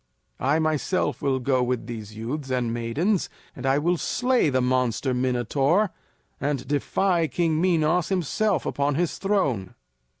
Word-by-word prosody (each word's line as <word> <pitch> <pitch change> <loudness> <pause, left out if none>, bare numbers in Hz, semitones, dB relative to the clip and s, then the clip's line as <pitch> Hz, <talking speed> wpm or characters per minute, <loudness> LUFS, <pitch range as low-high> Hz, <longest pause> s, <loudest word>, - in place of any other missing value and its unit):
I 140 +4 +2
myself 155 +3 0
will 135 -2 +1
go 130 0 +1
with 125 -2 -1
these 110 -3 -7
youths 130 +6 -4
and 125 -3 0
maidens, 145 - 0 0.3
and 130 +1 -4
I 135 +1 +3
will 175 +4 +1
slay 250 -1 +1
the 130 -2 +1
monster 125 0 +1
Minotaur, 135 - +1 0.5
and 140 -2 -2
defy 165 +4 +1
King 160 -1 0
Minos 170 -1 +2
himself 190 - 0
upon 140 0 0
his 170 +2 -1
throne." 145 - 0
140 Hz, 140 wpm, -25 LUFS, 125-170 Hz, 0.5 s, I